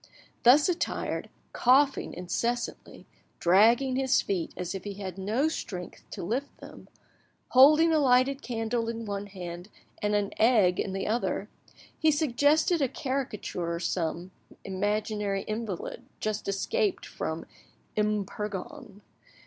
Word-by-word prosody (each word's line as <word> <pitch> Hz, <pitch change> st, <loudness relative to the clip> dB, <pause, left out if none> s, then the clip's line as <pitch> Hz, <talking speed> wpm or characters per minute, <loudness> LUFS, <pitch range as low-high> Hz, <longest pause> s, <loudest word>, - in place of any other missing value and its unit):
Thus 270 Hz, +5 st, +6 dB
attired, 360 Hz, -2 st, -2 dB, 0.2 s
coughing 270 Hz, +3 st, +3 dB
incessantly, 230 Hz, +8 st, -3 dB, 0.3 s
dragging 230 Hz, +9 st, +4 dB
his 265 Hz, -1 st, +3 dB
feet 180 Hz, -4 st, -2 dB
as 180 Hz, -1 st, -3 dB
if 190 Hz, -2 st, -6 dB
he 205 Hz, -1 st, -6 dB
had 190 Hz, -2 st, -6 dB
no 220 Hz, +10 st, +1 dB
strength 180 Hz, -, -6 dB
to -, -, -6 dB
lift 245 Hz, +10 st, -3 dB
them, -, -, -13 dB, 0.6 s
holding 305 Hz, +6 st, +7 dB
a 310 Hz, -, +4 dB
lighted 265 Hz, 0 st, +3 dB
candle 230 Hz, -1 st, -2 dB
in 230 Hz, 0 st, -5 dB
one 200 Hz, -1 st, -4 dB
hand 180 Hz, -1 st, -8 dB, 0.3 s
and 210 Hz, 0 st, +1 dB
an 205 Hz, -1 st, 0 dB
egg 215 Hz, -6 st, +4 dB
in 190 Hz, -, -2 dB
the 195 Hz, -, -2 dB
other, 230 Hz, +3 st, -1 dB, 0.5 s
he 315 Hz, -, +4 dB
suggested 300 Hz, +3 st, +2 dB
a 275 Hz, -, +3 dB
caricature 235 Hz, -, -3 dB
some 170 Hz, +1 st, -2 dB, 0.3 s
imaginary 205 Hz, +1 st, -1 dB
invalid 215 Hz, -4 st, -5 dB, 0.2 s
just 215 Hz, -1 st, -3 dB
escaped 400 Hz, -, 0 dB
from -, -, -4 dB, 0.5 s
M. 210 Hz, -1 st, +1 dB
Purgon. 210 Hz, +3 st, -7 dB
215 Hz, 125 wpm, -28 LUFS, 195-265 Hz, 0.6 s, holding